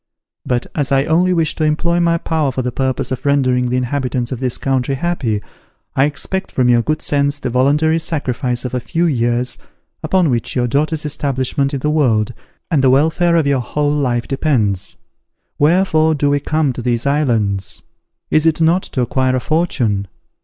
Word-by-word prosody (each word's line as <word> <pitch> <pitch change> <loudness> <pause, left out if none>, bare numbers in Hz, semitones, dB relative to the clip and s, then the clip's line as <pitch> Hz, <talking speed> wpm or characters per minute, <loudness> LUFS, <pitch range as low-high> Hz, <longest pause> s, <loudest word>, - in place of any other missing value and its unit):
But 125 -1 0
as 145 -3 -1
I 135 0 +3
only 175 +4 +2
wish 165 -3 +1
to 155 - -1
employ 170 +3 +1
my 170 -1 +2
power 160 -4 -1
for 130 0 -3
the 125 - -2
purpose 130 +1 -2
of 130 +1 -3
rendering 130 -3 +2
the 125 +1 0
inhabitants 125 -1 -2
of 130 - -4
this 125 -2 -2
country 135 0 -1
happy, 130 -9 -2 0.5
I 135 - +4
expect 150 +6 -3
from 125 -1 +1
your 120 -1 +4
good 155 +6 -2
sense 140 0 +1
the 125 - -4
voluntary 150 +6 +2
sacrifice 130 -6 -2
of 125 - -4
a 125 - 0
few 165 +8 -1
years, 120 -4 0 0.4
upon 180 -6 +2
which 120 -3 -2
your 125 -1 +1
daughter's 150 +5 0
establishment 140 -1 -1
in 135 - -4
the 150 - 0
world, 120 -7 +1 0.4
and 145 -5 +2
the 130 - +5
welfare 160 +6 +3
of 165 -3 +2
your 140 -2 +2
whole 145 +4 -1
life 125 -5 -1
depends. 120 - 0 0.6
Wherefore 160 0 +3
do 145 0 +1
we 145 - +2
come 150 -1 0
to 125 - -6
these 120 0 -1
islands? 115 - 0 0.5
Is 155 +1 +3
it 160 0 +2
not 165 +3 +3
to 130 - -3
acquire 130 +1 +1
a - - +1
fortune? 125 - 0
140 Hz, 185 wpm, -17 LUFS, 125-155 Hz, 0.6 s, the